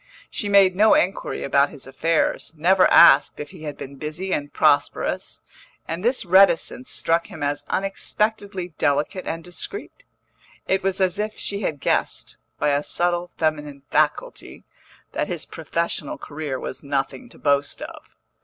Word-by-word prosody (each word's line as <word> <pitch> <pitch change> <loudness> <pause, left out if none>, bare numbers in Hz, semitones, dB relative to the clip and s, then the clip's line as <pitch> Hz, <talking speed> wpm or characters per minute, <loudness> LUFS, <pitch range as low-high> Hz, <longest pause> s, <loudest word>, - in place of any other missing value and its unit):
She 205 - -3
made 195 -2 +5
no 215 +3 +5
inquiry 185 +2 -1
about 140 +1 +3
his 145 -4 -10
affairs, 160 +4 -1
never 185 +4 +4
asked 145 -4 +6
if 150 +1 -7
he 165 -5 -11
had 145 -1 -6
been 140 0 -9
busy 155 +7 -4
and 145 0 -2
prosperous; - - +1 0.5
and 165 +3 -4
this 245 -1 +1
reticence 175 -8 +4
struck 165 +1 0
him - - -8
as 145 0 -2
unexpectedly 195 -1 -2
delicate 150 +6 0
and 165 0 -4
discreet; 290 - -6 0.6
it 190 0 +1
was 195 0 0
as 185 +1 +1
if 215 +1 -3
she 200 0 -2
had 150 -7 -2
guessed, - - -1 0.2
by - - +1
a 145 0 +2
subtle 175 +2 -1
feminine 150 -3 -2
faculty, - - -1 0.5
that - - -2
his - - -3
professional 170 -3 -2
career 145 -3 -5
was 130 - -7
nothing 140 - -3
to - - -14
boast 145 0 0
of. - - -11
165 Hz, 155 wpm, -23 LUFS, 145-190 Hz, 0.6 s, asked